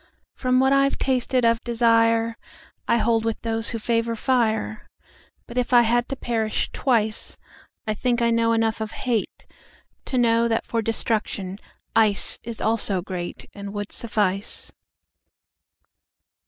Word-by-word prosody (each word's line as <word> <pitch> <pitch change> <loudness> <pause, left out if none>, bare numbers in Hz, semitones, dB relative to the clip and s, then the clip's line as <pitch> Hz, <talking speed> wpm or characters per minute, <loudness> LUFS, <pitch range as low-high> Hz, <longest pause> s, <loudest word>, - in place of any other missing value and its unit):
From 255 -1 +1
what 265 +1 +4
I've 275 0 +3
tasted 255 -1 +1
of 230 0 +2
desireI 230 -1 +2 0.6
hold 230 -1 +2
with 225 -1 -2
those 225 0 +2
who 230 - -1
favor 230 +1 0
fire. 220 -3 0 0.6
But 245 0 -3
if 250 - -2
it 240 -1 +6
had 240 +2 +1
to 270 - -2
perish 225 -4 -2
twice,I 220 -2 -2
think 240 +3 0
I 235 -1 +2
know 230 0 +2
enough 225 -1 +1
of 220 0 -4
hateTo 245 +2 -6
know 230 -1 +3
that 225 -1 0
for 230 - -1
destruction 210 -3 -1 0.4
iceIs 225 +1 +1
also 205 -5 +1
greatAnd 190 +2 -7
would 205 -1 -5
suffice. 205 -3 -2
230 Hz, 125 wpm, -23 LUFS, 220-235 Hz, 0.6 s, it